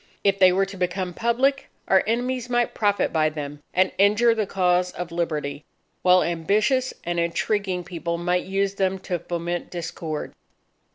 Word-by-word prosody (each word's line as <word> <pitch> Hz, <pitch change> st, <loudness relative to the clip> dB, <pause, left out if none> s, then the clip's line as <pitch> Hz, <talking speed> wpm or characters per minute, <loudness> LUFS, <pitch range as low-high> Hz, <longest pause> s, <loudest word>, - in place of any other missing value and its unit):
If 195 Hz, -1 st, +2 dB
they 185 Hz, -1 st, +7 dB
were 195 Hz, +2 st, +2 dB
to 195 Hz, 0 st, -10 dB
become 180 Hz, 0 st, -2 dB
public, 255 Hz, +7 st, +1 dB, 0.2 s
our 190 Hz, -, +4 dB
enemies 245 Hz, +2 st, -1 dB
might 240 Hz, -1 st, +1 dB
profit 205 Hz, -2 st, +1 dB
by 155 Hz, -1 st, +3 dB
them 145 Hz, -1 st, -7 dB
and 185 Hz, +1 st, +2 dB
injure 210 Hz, +4 st, +5 dB
the 215 Hz, -3 st, -1 dB
cause 180 Hz, -1 st, +1 dB
of 175 Hz, -1 st, -6 dB
Liberty; 150 Hz, -4 st, -3 dB, 0.4 s
while 180 Hz, 0 st, +5 dB
ambitious 210 Hz, -, +1 dB
and 175 Hz, 0 st, -2 dB
intriguing 180 Hz, +2 st, -1 dB
people 170 Hz, -1 st, -4 dB
might 180 Hz, +1 st, 0 dB
use 195 Hz, +1 st, 0 dB
them 190 Hz, -1 st, 0 dB
to 180 Hz, -2 st, -3 dB
foment 175 Hz, +1 st, -4 dB
discord. 165 Hz, -3 st, -5 dB
185 Hz, 160 wpm, -24 LUFS, 170-205 Hz, 0.4 s, they